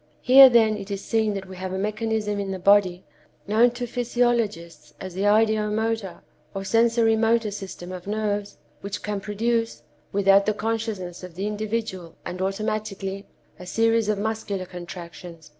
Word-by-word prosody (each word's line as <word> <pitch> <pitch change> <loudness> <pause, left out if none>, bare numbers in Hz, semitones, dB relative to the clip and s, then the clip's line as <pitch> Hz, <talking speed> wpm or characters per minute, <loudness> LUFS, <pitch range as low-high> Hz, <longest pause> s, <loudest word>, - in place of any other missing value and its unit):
"Here, 265 +1 +9
then, 220 -3 +4
it 200 0 -8
is 200 -1 -4
seen 220 -2 +1
that 195 -1 -5
we 185 - -9
have 185 0 -5
a - - -2
mechanism 215 0 -2
in 200 -1 -3
the 190 - -3
body, 190 -1 +3 0.4
known 225 +4 +4
to 245 0 -4
physiologists 235 -8 -1
as 185 -2 -7
the 190 +3 -2
ideo 215 0 +3
motor, 220 -5 -2 0.3
or 195 - -3
sensory 225 +2 +3
motor 225 -1 +2
system 190 -3 -8
of 185 0 -8
nerves, 205 -1 -2 0.2
which 200 +1 -6
can 210 -1 -2
produce, 230 +3 -1 0.3
without 195 0 +4
the 215 - +1
consciousness 210 -5 -3
of 180 -2 -9
the 195 +3 -3
individual 210 -4 -4
and 180 +1 -5
automatically, 195 0 -3 0.3
a 180 - -10
series 225 +1 +2
of 210 - +1
muscular 205 -3 -3
contractions. 175 -2 -10
210 Hz, 160 wpm, -24 LUFS, 190-225 Hz, 0.4 s, Here